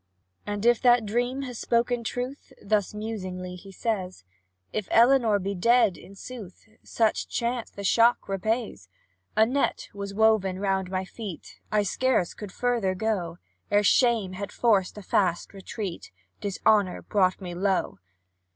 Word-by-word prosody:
"And 205 +1 -3
if 240 -1 +4
that 240 -2 +5
dream 245 +5 -1
has 250 -4 -6
spoken 235 0 +1
truth," 250 +5 -5
Thus 205 -1 0
musingly 185 -4 -5
he 195 +2 -12
says; 190 - -3 0.5
"If 215 -3 -2
Elinor 235 -3 +5
be 200 0 -3
dead, 230 0 +3
in 200 - -14
sooth, 210 -3 -10
Such 225 -2 0
chance 235 0 -2
the 200 - -9
shock 230 +4 +3
repays: 195 - -2 0.5
A 220 - +7
net 270 +5 -1
was 200 0 -6
woven 215 -4 +3
round 190 -1 -1
my 190 0 -2
feet, 195 -4 -9
I 210 -1 +3
scarce 250 -3 +1
could 210 -3 -8
further 230 -5 0
go; 185 -5 -2 0.3
Ere 205 0 +3
shame 225 -3 +3
had 200 +1 -5
forced 210 -5 +2
a 210 - -8
fast 180 -1 0
retreat, 195 - -6 0.3
Dishonour 205 -1 +1
brought 185 -3 +1
me 180 -3 -6
low. 190 - -1
205 Hz, 145 wpm, -26 LUFS, 190-235 Hz, 0.5 s, A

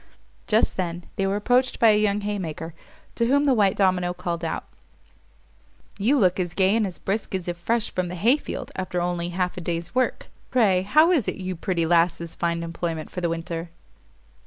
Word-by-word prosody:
Just - - +2
then 175 -1 -3
they 195 -2 0
were 195 - 0
approached 245 +5 +2
by 225 -2 +7
a - - +4
young 205 -1 +1
haymaker, 170 -6 -4 0.4
to 235 - 0
whom 285 +3 +3
the 280 -2 +4
white 205 -5 +3
domino 180 -2 +1
called 170 -1 -4
out, 165 - -2 1.4
"You 245 +9 +3
look 190 -5 +3
as 175 -1 -2
gay 195 +2 +3
and 220 -3 +2
as 180 - -7
brisk 200 0 -2
as 185 -2 -4
if 175 - -2
fresh 225 +6 -1
from 185 -1 -1
the 180 - -5
hay 230 - +4
field 275 -3 -6
after 185 -1 -2
only 175 0 -1
half 180 +1 -2
a - - -4
day's 170 0 -4
work. 255 0 0 0.2
Pray, 205 -8 +3
how 305 - +4
is 300 - +2
it - - -1
you 185 -1 -4
pretty 170 -1 -1
lasses 170 0 +2
find 170 0 -1
employment 165 -1 -4
for 180 - -5
the 170 - 0
winter?" 165 0 -4
185 Hz, 200 wpm, -24 LUFS, 170-210 Hz, 1.4 s, by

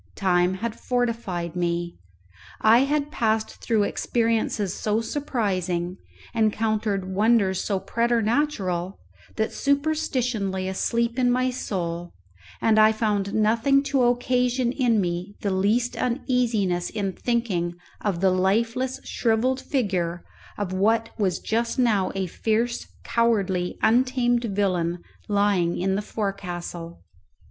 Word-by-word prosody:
Time 180 -2 +2
had 230 +3 -4
fortified 230 -9 -2
me; 175 -1 -2 0.6
I 225 +2 +6
had 295 +1 -1
passed 220 -1 -1
through 220 -3 +2
experiences 225 -2 0
so 215 0 0
surprising, 190 - -2 0.4
encountered 215 -3 0
wonders 205 -2 +3
so 195 -3 -1
preternatural, 220 - 0 0.4
that 220 0 -1
superstition 280 -7 0
lay 190 0 -3
asleep 235 +5 0
in 250 -1 +3
my 255 +1 +2
soul, 175 -8 -4 0.5
and 220 -1 +4
I 215 0 +7
found 210 -3 -1
nothing 230 +6 +3
to 270 - +4
occasion 245 0 +1
in 245 -4 +2
me 180 +2 -2
the 200 - 0
least 215 +6 +1
uneasiness 235 -8 0
in 200 -3 -2
thinking 195 -9 -1 0.3
of 190 -5 -1
the 190 -1 +4
lifeless 230 +7 +1
shrivelled 245 +3 0
figure 180 - -1 0.3
of 200 -3 -3
what 225 +4 +2
was 190 -4 +1
just 230 +1 -1
now 220 -7 +2
a 190 -1 -1
fierce, 225 +6 -1 0.2
cowardly, 195 -6 +1
untamed 245 0 +3
villain, 185 -5 0 0.3
lying 200 -4 +2
in 190 +2 0
the 200 - 0
forecastle. 175 -5 -5
215 Hz, 120 wpm, -24 LUFS, 190-240 Hz, 0.6 s, I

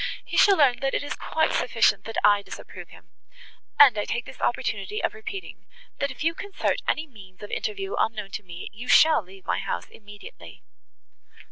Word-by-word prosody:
He - - -6
shall 395 -2 +6
learn, 270 -5 +4
that 270 -1 -1
it - - -1
is 290 - -4
quite 315 0 0
sufficient, - - +2
that 225 - -6
I 205 -1 +5
disapprove - - -10
him. - - -17 0.7
And 275 -5 +8
I 205 - -1
take 240 - -3
this - - -12
opportunity 425 +1 -1
of - - 0
repeating,—that 435 -5 -7
if 260 +1 -7
you 325 +1 +2
concert 395 +3 -2
any 310 - 0
means 195 -9 -15
of 205 - -8
interview 395 -2 -3
unknown 210 -3 -1
to 210 - -5
me, 175 -2 -9
you 235 +5 -9
shall 315 -5 +6
leave 190 0 -16
my - - 0
house 85 0 -4
immediately." 205 - -13
245 Hz, 180 wpm, -25 LUFS, 205-320 Hz, 0.7 s, And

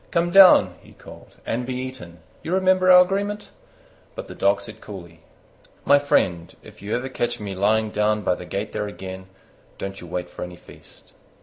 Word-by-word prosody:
"Come 170 +1 0
down," 175 - +7
he - - -18
called, - - -15
"and 120 +2 -2
be 125 +1 -4
eaten: 125 -11 -8 0.2
you 175 - -2
remember 185 0 +3
our 180 0 +9
agreement?" 200 +3 -4 0.6
But - - -7
the - - -9
Dog 100 +1 +1
said - - -11
coolly, 85 -5 -11 0.7
"My 145 0 +5
friend, 90 -12 0
if - - -15
ever 105 +5 -3
you 135 - -5
catch 120 -2 -2
me 100 -2 -5
lying 105 +3 +1
down 105 0 0
by - - +1
the 90 - -8
gate 100 +3 -4
there 105 -1 -3
again, 95 -2 -9 0.5
don't 95 0 -6
you 90 - -10
wait 90 +1 -4
for - - -12
any 90 0 -6
feast." - - -18
105 Hz, 190 wpm, -22 LUFS, 95-145 Hz, 0.7 s, our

